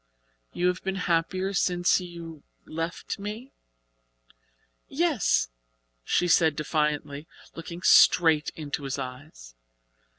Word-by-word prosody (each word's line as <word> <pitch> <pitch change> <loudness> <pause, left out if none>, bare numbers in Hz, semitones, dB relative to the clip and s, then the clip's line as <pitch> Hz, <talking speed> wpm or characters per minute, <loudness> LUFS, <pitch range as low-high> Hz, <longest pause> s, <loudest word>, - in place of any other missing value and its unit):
You 175 - -2
have 180 0 0
been 195 0 -2
happier 185 +2 -1
since 180 -1 +2
you 170 -3 -9 0.2
left 165 +4 -5
me?" 215 +6 -7 1.4
"Yes," 280 - +1 0.5
she 175 - +1
said 160 -2 +4
defiantly, 150 -1 -2 0.3
looking 170 +1 -8
straight 160 -4 +5
into 145 -2 -5
his 135 0 -3
eyes. 125 - -9
165 Hz, 100 wpm, -26 LUFS, 150-180 Hz, 1.4 s, straight